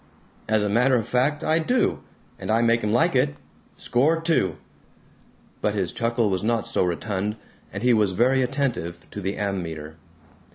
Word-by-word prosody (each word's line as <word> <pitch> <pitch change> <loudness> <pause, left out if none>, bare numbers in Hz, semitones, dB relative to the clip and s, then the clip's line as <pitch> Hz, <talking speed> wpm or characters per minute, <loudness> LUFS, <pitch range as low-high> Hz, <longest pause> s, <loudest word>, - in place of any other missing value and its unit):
"As 110 -1 +3
a - - +1
matter 125 +6 +3
of 115 -2 0
fact, 140 +6 +1
I 160 +1 +2
do! 245 +10 +1 0.4
And - - -6
I 115 +2 +3
make 115 0 +2
'em 105 - 0
like 160 +7 +2
it. 100 - +2 0.4
Score 150 +7 +1
two!" 160 - +1 1.0
But 105 0 0
his 95 -4 -1
chuckle 115 -1 0
was 95 0 -1
not 115 0 0
so - - +1
rotund, 100 +3 -2 0.4
and 100 +3 -6
he 125 -1 +4
was 105 -4 +2
very 130 +6 +3
attentive 125 - -2
to 105 - -6
the 95 +1 -2
ammeter. 80 -6 -4
110 Hz, 170 wpm, -24 LUFS, 95-125 Hz, 1.0 s, he